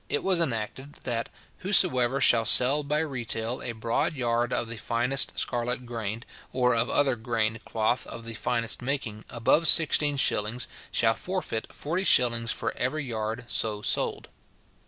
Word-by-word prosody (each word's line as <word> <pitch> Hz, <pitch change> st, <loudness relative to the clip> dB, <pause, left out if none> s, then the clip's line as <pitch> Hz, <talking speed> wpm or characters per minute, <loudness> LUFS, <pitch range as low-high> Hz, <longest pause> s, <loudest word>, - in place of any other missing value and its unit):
it 145 Hz, -, -2 dB
was 185 Hz, -3 st, +1 dB
enacted, 130 Hz, +1 st, -4 dB
that 115 Hz, -2 st, -3 dB, 0.3 s
"whosoever 140 Hz, -10 st, +3 dB
shall 115 Hz, -4 st, +4 dB
sell 130 Hz, +6 st, +5 dB
by 150 Hz, +1 st, -2 dB
retail 120 Hz, -5 st, -2 dB
a 120 Hz, -, -4 dB
broad 115 Hz, +6 st, -2 dB
yard 120 Hz, -1 st, -1 dB
of 120 Hz, -, -1 dB
the 115 Hz, 0 st, -5 dB
finest 125 Hz, +5 st, -1 dB
scarlet 125 Hz, +1 st, -2 dB
grained, 115 Hz, -1 st, -5 dB, 0.3 s
or 125 Hz, -1 st, +1 dB
of 115 Hz, +1 st, 0 dB
other 135 Hz, -3 st, +2 dB
grained 115 Hz, -1 st, -2 dB
cloth 115 Hz, +2 st, -1 dB
of 115 Hz, -, -9 dB
the 115 Hz, -, -5 dB
finest 115 Hz, +1 st, -2 dB
making, 120 Hz, -5 st, -4 dB
above 135 Hz, +8 st, +2 dB
sixteen 150 Hz, -3 st, +7 dB
shillings, 115 Hz, -1 st, 0 dB, 0.3 s
shall 115 Hz, -1 st, +2 dB
forfeit 180 Hz, -8 st, -5 dB
forty 170 Hz, +6 st, -4 dB
shillings 115 Hz, -8 st, +3 dB
for -, -, -3 dB
every 140 Hz, +3 st, -3 dB
yard 115 Hz, 0 st, -5 dB
so 105 Hz, -3 st, -1 dB
sold." -, -, -1 dB
120 Hz, 155 wpm, -26 LUFS, 115-140 Hz, 0.3 s, sixteen